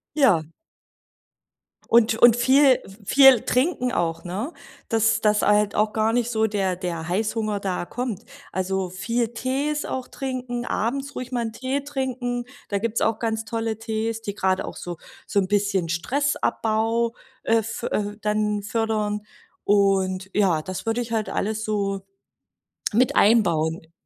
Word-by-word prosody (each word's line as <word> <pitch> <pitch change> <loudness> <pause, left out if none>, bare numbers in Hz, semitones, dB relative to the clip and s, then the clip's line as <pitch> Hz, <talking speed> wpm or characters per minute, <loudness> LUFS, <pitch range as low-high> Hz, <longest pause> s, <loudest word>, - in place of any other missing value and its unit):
Ja. 225 - +4 1.5
Und 225 -1 +5
und 240 -1 +8
viel 260 +2 +5 0.2
viel 270 +4 +7
trinken 250 -1 +1
auch, 165 -7 -1
ne? 205 - -4 0.4
Dass 225 -1 +2
dass 210 -1 +3
halt 210 0 +3
auch 210 0 +1
gar 220 +1 +1
nicht 240 -1 +1
so 220 -1 +1
der 195 -4 0
der 170 -3 -4
Heißhunger 215 +1 -1
da 185 -3 -2
kommt. 245 -1 -4 0.3
Also 190 0 -1
viel 230 +5 -1
Tees 275 +5 -1
auch 260 -1 -4
trinken, 255 -2 -4
abends 275 +6 -2
ruhig 250 0 -6
mal 245 -2 -1
'n - - -6
Tee 260 +4 -2
trinken. 255 -3 -3 0.2
Da 200 - 0
gibt's 230 +2 -1
auch 225 -1 +2
ganz 220 -1 -2
tolle 225 -1 -3
Tees, 225 0 -2
die 205 -3 -5
gerade 190 -2 0
auch - - -7
so 175 -1 -6 0.3
so 205 - +1
'n 190 - 0
bisschen 200 -3 +1
Stressabbau, 230 - 0 0.3
äh 225 - +2
f 225 0 -3
äh, 205 0 -2
dann 210 0 0
fördern. 215 -1 -1 0.4
Und 195 -2 +2
ja, 185 -7 +3
das 185 +6 -6
würde 225 +2 0
ich 235 -1 -6
halt 220 -2 -1
alles 220 +1 -2
so, 200 -3 -1 0.9
mit 250 +3 +3
einbauen. 165 -7 +3
220 Hz, 150 wpm, -24 LUFS, 200-240 Hz, 1.5 s, und